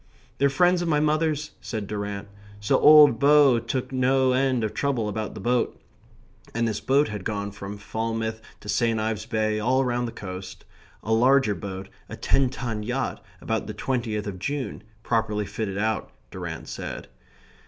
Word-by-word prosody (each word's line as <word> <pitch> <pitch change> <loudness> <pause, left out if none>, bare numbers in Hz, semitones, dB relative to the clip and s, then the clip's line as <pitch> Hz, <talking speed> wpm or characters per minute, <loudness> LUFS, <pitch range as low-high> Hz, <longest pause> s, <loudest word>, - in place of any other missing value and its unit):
"They're 140 +1 +4
friends 175 +5 +3
of 175 - -1
my 150 -2 +3
mother's," 155 0 +1
said 110 -4 -4
Durrant. 100 0 -4 0.3
"So 105 - +2
old 150 -6 +8
Bow 140 -4 +6
took 125 +3 -3
no 130 0 +3
end 130 -2 +2
of 110 -1 -2
trouble 130 -4 0
about 105 +1 -4
the - - -6
boat." 120 +4 0 0.8
And 115 0 +1
this 110 -2 -2
boat 140 +3 +2
had 105 -3 -5
gone 100 -1 -3
from 100 0 -7
Falmouth 110 +1 -3 0.2
to - - -12
St. 115 0 +1
Ives 110 -1 -2
Bay, 110 -1 0
all 130 +4 +2
round 120 0 0
the - - -5
coast. 95 -3 -8 0.4
A 110 - 0
larger 130 0 +4
boat, 95 -1 -6 0.2
a - - -6
ten 135 -2 +2
ton 120 -4 -4
yacht, 125 +5 -3 0.2
about - - -2
the - - -6
twentieth 115 -5 -2
of 95 -3 -5
June, 140 +5 -3 0.2
properly 110 -3 0
fitted 100 -1 -4
out, 110 +1 -1 0.2
Durrant - - -6
said... - - -6
115 Hz, 170 wpm, -25 LUFS, 105-135 Hz, 0.8 s, old